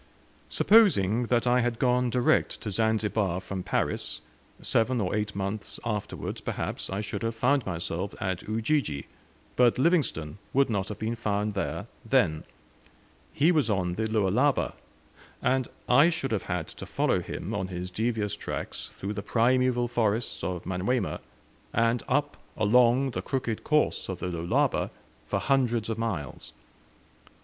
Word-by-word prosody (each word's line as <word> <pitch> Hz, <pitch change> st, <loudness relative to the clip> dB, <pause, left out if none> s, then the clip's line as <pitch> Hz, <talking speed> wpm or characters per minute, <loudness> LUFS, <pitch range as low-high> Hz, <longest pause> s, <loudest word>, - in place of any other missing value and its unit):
Supposing 125 Hz, -, +4 dB
that 120 Hz, 0 st, +2 dB
I 125 Hz, 0 st, +4 dB
had 120 Hz, -1 st, 0 dB
gone 125 Hz, 0 st, +2 dB
direct 125 Hz, +1 st, +2 dB
to 105 Hz, -, -4 dB
Zanzibar 105 Hz, -3 st, +1 dB
from 95 Hz, 0 st, -5 dB
Paris, -, -, -2 dB, 0.4 s
seven 120 Hz, +2 st, +1 dB
or 95 Hz, -4 st, -1 dB
eight 105 Hz, -1 st, -1 dB
months 100 Hz, +1 st, -3 dB
afterwards, 105 Hz, -3 st, -3 dB
perhaps, -, -, -4 dB
I 95 Hz, +2 st, -2 dB
should 105 Hz, -, -4 dB
have 115 Hz, 0 st, -2 dB
found 125 Hz, +2 st, +2 dB
myself 90 Hz, +2 st, -3 dB
at 95 Hz, -2 st, -2 dB
Ujiji, 110 Hz, -, 0 dB, 0.5 s
but 125 Hz, -1 st, +4 dB
Livingstone 130 Hz, -, +1 dB
would 135 Hz, -2 st, +3 dB
not 100 Hz, -2 st, 0 dB
have 105 Hz, -, -5 dB
been 110 Hz, +2 st, -2 dB
found 105 Hz, -2 st, -1 dB
there 95 Hz, -, -3 dB, 0.2 s
then; 80 Hz, 0 st, +2 dB, 0.9 s
he 155 Hz, +5 st, +3 dB
was 150 Hz, -9 st, +2 dB
on 90 Hz, -4 st, 0 dB
the 110 Hz, +4 st, -1 dB
Lualaba; 110 Hz, +6 st, +2 dB, 0.7 s
and 130 Hz, -1 st, +1 dB, 0.2 s
I 140 Hz, +7 st, +6 dB
should 165 Hz, -6 st, -2 dB
have 110 Hz, -, -2 dB
had 90 Hz, -3 st, -1 dB
to -, -, -9 dB
follow -, -, +1 dB
him 110 Hz, -, -5 dB
on 100 Hz, -3 st, -2 dB
his 90 Hz, 0 st, -5 dB
devious 110 Hz, -1 st, -1 dB
tracks -, -, -5 dB
through 100 Hz, +2 st, -4 dB
the 100 Hz, -, -4 dB
primeval 120 Hz, +2 st, +2 dB
forests 115 Hz, -1 st, 0 dB
of 90 Hz, -2 st, -3 dB
Manyuema, 95 Hz, +4 st, -1 dB, 0.5 s
and 115 Hz, +1 st, +2 dB
up 145 Hz, +2 st, +1 dB, 0.2 s
along 125 Hz, +4 st, +4 dB
the -, -, -3 dB
crooked 125 Hz, -5 st, -2 dB
course 150 Hz, -8 st, +1 dB
of 95 Hz, -, -3 dB
the 90 Hz, -, -3 dB
Lualaba 85 Hz, 0 st, +1 dB, 0.4 s
for -, -, 0 dB
hundreds 120 Hz, -5 st, +1 dB
of 110 Hz, 0 st, -2 dB
miles. 95 Hz, -13 st, -4 dB
110 Hz, 150 wpm, -28 LUFS, 95-125 Hz, 0.9 s, I